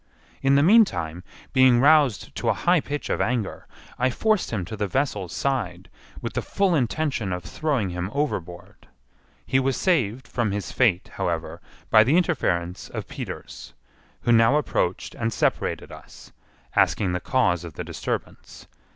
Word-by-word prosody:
In 135 0 +3
the 140 - +5
meantime, 155 - +3 0.3
being 130 -2 +5
roused 145 -4 +4
to - - -2
a - - +2
high 175 0 +3
pitch 145 +1 -5
of - - 0
anger, 115 -4 -2 0.3
I 125 +1 +3
forced 215 - +1
him 100 -6 -3
to 110 - -6
the 105 -1 -2
vessel's 105 - -1
side, 95 -10 -2 0.3
with - - -4
the - - -1
full 195 -2 0
intention 130 - -1
of 90 -1 -3
throwing 135 - -1
him 90 +1 -3
overboard. 90 - -4 0.6
He 130 - +2
was 135 0 0
saved 130 - 0
from 120 -4 -1
his 100 0 -4
fate, 105 -8 +2
however, 85 -4 -3 0.3
by 110 -1 +8
the 140 +9 +3
interference 90 - -1
of - - -6
Peters, - - -8 0.5
who 120 - +1
now 115 +3 +5
approached 95 -11 -1
and 115 -1 -2
separated - - -1
us, - - -13 0.4
asking 95 -4 +2
the 90 - -1
cause 90 -7 +1
of 85 -3 -8
the - - -5
disturbance. - - -6
120 Hz, 160 wpm, -24 LUFS, 95-140 Hz, 0.6 s, by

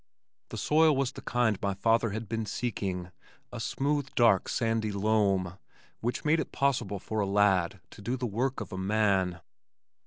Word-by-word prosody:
The - - -6
soil 155 0 +4
was 135 -1 0
the - - -10
kind 120 -4 0
my 100 -1 -1
father 115 +3 +2
had 110 +2 -5
been 110 0 -3
seeking, 95 -6 -3 0.4
a - - -6
smooth 140 0 -1
dark 115 -6 +4
sandy 115 -2 0
loam, 100 -3 +1 0.4
which 120 +6 -3
made 155 +2 +3
it - - -3
possible 120 -7 0
for 110 +3 -4
a 100 - +1
lad 95 -3 +2
to - - -12
do 120 +5 -2
the 125 - -3
work 125 +4 -1
of - - -7
a 95 - -4
man. 95 -3 +1
110 Hz, 175 wpm, -29 LUFS, 100-120 Hz, 0.4 s, soil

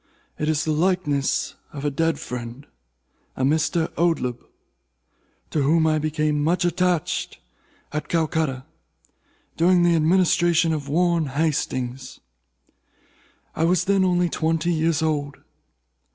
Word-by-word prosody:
It 150 - -1
is 155 -1 0
the 155 - 0
likeness 155 -4 0 0.2
of 145 -1 -7
a 145 - +1
dead 165 +4 0
friend—a 115 - -9
Mr. 160 +3 +1
Oldeb—to 125 - -5
whom 160 +4 +3
I 155 -1 +2
became 150 -1 0
much 175 +3 +1
attached 175 -1 -1 0.6
at 150 -1 -3
Calcutta, 155 -5 -1 0.9
during 175 +1 +4
the 175 -1 +4
administration 170 0 +3
of 145 -2 -4
Warren 170 0 +1
Hastings. 135 -3 -2 1.4
I 160 - 0
was 175 +1 +2
then 195 -1 +2
only 180 -1 +2
twenty 165 +1 0
years 160 0 +1
old. 145 -3 -1
155 Hz, 110 wpm, -23 LUFS, 145-170 Hz, 1.4 s, during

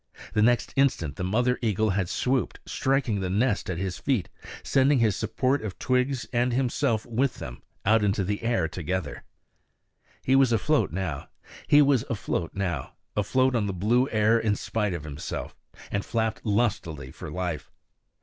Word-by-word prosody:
The 105 - +2
next 120 +2 +2
instant 130 - +1
the - - -4
mother 120 +7 +1
eagle 110 -2 +1
had 95 -2 -1
swooped, 130 -1 0
striking 135 -6 0
the 95 -1 -2
nest 105 +2 +1
at 90 - -2
his 95 0 -3
feet, 130 -10 0 0.3
sending 135 +1 +3
his 110 -5 +3
support 130 +6 0
of 105 -5 -5
twigs 130 0 0
and 120 +1 +2
himself 120 -3 0
with 125 +3 0
them - - -8 0.2
out 110 +2 +4
into 100 -1 +1
the 100 +2 -2
air 115 -7 +1
together. 90 -1 -4 1.0
He 130 - +3
was 135 -2 +5
afloat 145 +6 +2
now, 85 -5 -3 0.4
afloat 115 - +1
on 105 -3 +1
the 100 - -2
blue 120 +8 +2
air 110 +1 +3
in 105 -2 +1
spite 105 -3 -2
of 80 - -6
himself, 75 -1 -6 0.4
and 100 0 -1
flapped 110 -2 -1
lustily 95 - -1
for - - -8
life. 85 -3 -4
110 Hz, 150 wpm, -26 LUFS, 95-125 Hz, 1.0 s, was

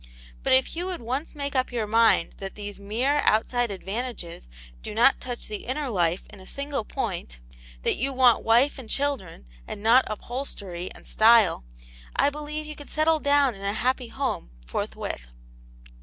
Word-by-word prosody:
But - - 0
if 260 +4 +3
you 350 +2 -2
would 360 -9 -5
once 265 +8 -3
make 280 -1 -4
up 255 -1 +1
your 235 -3 -1
mind 225 -5 +4
that 195 0 -6
these 205 -1 -6
mere 245 +9 +1
outside 240 +2 +2
advantages 195 - -5 0.3
do - - -7
not 240 +4 +5
touch 245 -1 -6
the 210 -1 -6
inner 270 +1 -2
life 175 -3 +1
in - - -12
a 190 - -12
single 280 -3 -3
point; - - -4 0.5
that - - +1
you 270 +4 0
want 255 -3 +4
wife 240 +6 +4
and 235 -4 -10
children, 260 - -2 0.2
and 205 - -7
not 240 +4 +6
upholstery 200 -6 -5
and - - -14
style, 220 - +5 0.5
I 285 - +3
believe 300 +1 -5
you 305 0 -7
could 290 - -11
settle 315 +1 +2
down 285 -3 +3
in 195 - -11
a 200 0 -1
happy 250 +2 0
home 265 - -3 0.2
forthwith." - - -4
245 Hz, 170 wpm, -26 LUFS, 205-280 Hz, 0.5 s, not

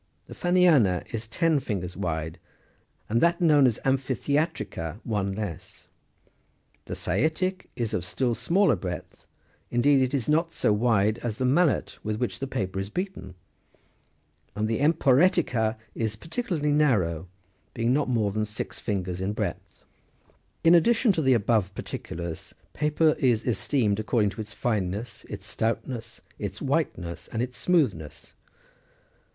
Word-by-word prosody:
The - - -10
Eanniana 165 - +3
is 115 0 -4
ten 155 +7 +2
fingers 90 -8 -4
wide, 80 -2 -3 0.7
and 115 +2 +1
that 170 0 +3
known 150 -6 +5
as 115 - 0
" - - -21
amphitheatrica," 135 - -1
one 100 -4 -1
less. 100 -7 -7 1.0
The - - -5
Saitic 160 - -1
is 120 -3 -2
of 90 - -1
still 105 +8 -1
smaller 190 - +3
breadth, 90 -2 -7 0.4
indeed 135 +3 +4
it 130 +2 +1
is 125 -5 -2
not 165 +2 +2
so 110 -4 +2
wide 110 -1 +2
as 115 -3 -3
the 130 - 0
mallet 150 +4 +2
with 110 0 -1
which 125 - -2
the 135 - -3
paper 95 -8 -3
is 95 +1 -3
beaten; 180 - -5 1.2
and 105 +1 0
the 110 0 -1
emporetica 140 -6 +3 0.2
is 110 -2 -2
particularly 165 - -2
narrow, 95 - +2 0.5
being 115 +2 +1
not 145 -1 +1
more 110 -5 +1
than 110 +1 -1
six 105 +1 -6
fingers 95 -3 -3
in 100 +2 -1
breadth. 105 -5 -5 0.8
In 165 - +7
addition 225 +6 +5
to 165 - 0
the 130 -3 +4
above 105 -4 +1
particulars, 85 -3 -6 0.2
paper 150 +1 +2
is 120 -5 +2
esteemed 110 -1 +1
according 110 -1 +1
to 110 - -6
its 105 0 -8
fineness, 105 0 -3
its - - -7
stoutness, 115 +1 -3 0.2
its 100 0 -4
whiteness, 130 - -2
and 115 +1 -1
its 125 0 -5
smoothness. 95 - 0
115 Hz, 145 wpm, -26 LUFS, 100-145 Hz, 1.2 s, In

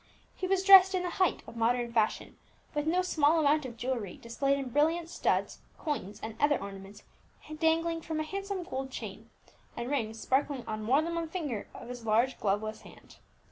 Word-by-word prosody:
He 370 - -3
was 380 0 +1
dressed 385 -1 +9
in 365 - 0
the 355 - -2
height 370 - +2
of - - -11
modern 235 +1 0
fashion, 220 -2 0 0.4
with 295 0 -1
no 360 +3 +2
small 320 -3 +3
amount 300 -2 +2
of 235 -2 -10
jewellery 240 -7 -3
displayed 275 +4 0
in 270 -2 -4
brilliant 320 +5 +1
studs, - - 0 0.2
coins 210 - -4
and 220 0 -5
other 290 0 +3
ornaments 195 +1 -9 0.6
dangling 330 0 +1
from 315 -1 -4
a - - 0
handsome 390 +2 -4
gold 270 -6 -4
chain, - - -8 0.5
and 240 +3 -4
rings 225 -5 -2
sparkling 265 0 0
on 215 -1 -4
more 260 +8 +3
than 335 +1 -3
one 335 -1 -2
finger 295 - -4
of - - -9
his 245 -1 -7
large 230 +4 +2
gloveless 215 +2 -1
hand. - - -16
280 Hz, 185 wpm, -30 LUFS, 230-330 Hz, 0.6 s, dressed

